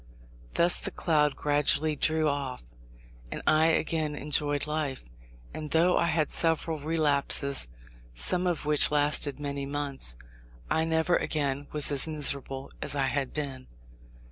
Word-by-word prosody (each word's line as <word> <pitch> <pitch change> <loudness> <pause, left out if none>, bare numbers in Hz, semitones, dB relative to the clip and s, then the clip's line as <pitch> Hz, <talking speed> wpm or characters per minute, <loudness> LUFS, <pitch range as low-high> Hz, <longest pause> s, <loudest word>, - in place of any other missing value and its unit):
Thus 175 +1 +5
the - - -1
cloud 150 -4 +1
gradually 150 +2 +1
drew 155 +2 +2
off, 140 - -3 0.7
and - - -5
I 155 +1 +4
again 160 -2 0
enjoyed 145 0 +1
life; 150 -4 -3 0.5
and 155 -1 -6
though 170 +3 +3
I - - +2
had 155 -2 0
several 165 -1 -1
relapses, 145 - +2 0.5
some 175 - +2
of 170 -4 -1
which 150 -1 +4
lasted 145 -1 +1
many 140 -1 -4
months, 140 - -4 0.6
I 160 - +2
never 160 +2 +2
again 145 -2 -2
was 150 -1 +2
as 140 +1 +1
miserable 140 -3 -2
as - - -2
I 135 -1 +1
had 135 -2 -2
been. 135 -4 -5
150 Hz, 140 wpm, -28 LUFS, 140-155 Hz, 0.7 s, Thus